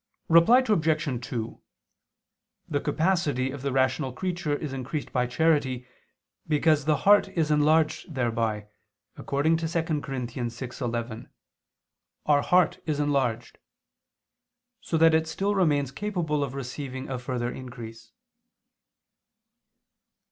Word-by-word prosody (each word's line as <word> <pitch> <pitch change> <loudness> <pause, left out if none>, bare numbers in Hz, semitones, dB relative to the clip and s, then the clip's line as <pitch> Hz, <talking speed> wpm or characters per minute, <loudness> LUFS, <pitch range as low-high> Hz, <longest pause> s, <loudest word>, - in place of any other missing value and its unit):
Reply 170 +11 +6
Obj. 155 - 0
2: 115 -3 -5 1.1
The 145 - -1
capacity 150 -5 0
of 140 -1 -7
the 140 0 -2
rational 130 +1 +1
creature 170 0 -2
is 145 -2 -5
increased 135 +3 -5
by 125 -1 +1
charity, 135 -3 +1 0.6
because 150 -1 +2
the 155 -1 +3
heart 205 +1 +6
is 160 -3 -1
enlarged 155 +2 +2
thereby, 115 -4 -1 0.5
according 150 +4 +1
to 165 0 -2
2 160 -2 -1
Cor. 135 +1 -5
6:11: 120 -1 -4 1.0
"Our 145 -1 +4
heart 180 +2 +3
is 150 -2 -1
enlarged"; 130 -6 -1 1.2
so 225 -9 -2
that 165 0 +5
it 160 0 +2
still 195 +5 -1
remains 145 -8 +1
capable 165 -5 -2
of 135 -1 -5
receiving 130 0 -6
a 130 -2 -4
further 125 -1 -3
increase. 120 -3 -9
145 Hz, 115 wpm, -26 LUFS, 125-160 Hz, 1.2 s, Reply